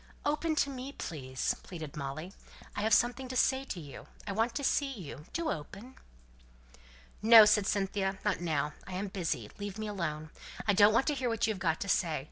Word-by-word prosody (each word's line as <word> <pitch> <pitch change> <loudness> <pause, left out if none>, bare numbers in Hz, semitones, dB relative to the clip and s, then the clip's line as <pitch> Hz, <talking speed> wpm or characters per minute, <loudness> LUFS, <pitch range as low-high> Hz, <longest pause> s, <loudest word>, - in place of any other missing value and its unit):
"Open 305 +2 +1
to 280 -2 +1
me, 265 +1 -6
please," 130 - -3
pleaded 160 -5 -8
Molly. 150 +6 -5 0.4
"I - - -2
have 220 +1 +1
something 245 +4 +3
to 255 - -6
say 265 +2 +2
to 190 - -5
you 145 -4 -10 0.2
I 205 - -3
want 225 +4 0
to 285 - -2
see 275 0 +1
you 155 - -8
do 335 -2 -1
open!" 200 - -7 1.3
"No!" 220 0 +10
said 210 -1 +4
Cynthia. 195 -1 0
"Not 205 -4 +1
now. 150 -3 0
I 190 - -7
am 195 +2 -3
busy. 165 - -3
Leave 205 0 -5
me 215 - -3
alone. 155 -6 -3 0.4
I 205 - +5
don't 205 +2 +7
want 250 - +4
to 300 - +1
hear 260 -3 -1
what 230 -2 +1
you 220 - +1
have 195 - -9
got 165 -2 0
to 200 - -2
say. 165 -6 +1
205 Hz, 205 wpm, -31 LUFS, 165-240 Hz, 1.3 s, No